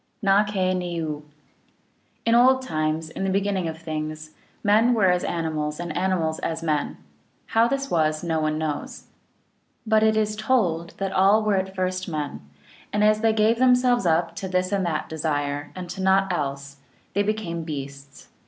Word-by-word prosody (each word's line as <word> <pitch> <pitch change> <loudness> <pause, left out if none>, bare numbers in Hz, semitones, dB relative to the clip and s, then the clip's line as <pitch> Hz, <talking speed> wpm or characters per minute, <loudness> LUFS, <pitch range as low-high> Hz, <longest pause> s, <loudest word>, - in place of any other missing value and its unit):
^ 200 +1 +4
kah 185 -2 +1
ne 175 -1 -3
oo. 150 -2 -4 1.0
In 230 - +3
old 260 +2 +5
times 155 -6 -2
(P.)? - - -16
m - - -2
the 195 - 0
beginning 195 -2 0
of 160 0 -5
things, 155 -1 -5 0.3
men 220 +4 +4
were 195 -5 +4
as 180 0 0
animals 155 -2 -2
and 175 -2 -5
animals 170 -4 0
as 165 0 -3
men; 150 -3 -1 0.6
how 225 +1 +5
this 275 +1 -2
was, 155 -1 +1
no 165 -2 0
one 155 0 0
knows. 155 -2 -4 0.8
But 220 -1 +3
it 220 0 +3
is 215 -1 +1
told 195 -8 0
that 195 -1 -2
all 200 +4 +4
were 215 -1 +1
at 190 0 -3
first 185 0 -2
men, 150 -3 -4 0.5
and 210 0 +1
as 215 0 +4
they 225 0 +4
gave 220 +2 +2
themselves 250 -4 +4
up 165 +1 +1
to 190 - -4
this 185 0 0
and 200 -1 +1
that 155 -2 -2
desire, 145 -2 -2
and 180 -1 -6
to 190 - -6
naught 190 0 +3
else, 140 -3 -4 0.4
they 200 - +2
became 205 -5 -2
beasts. 140 -2 -8
180 Hz, 180 wpm, -24 LUFS, 155-210 Hz, 1.0 s, old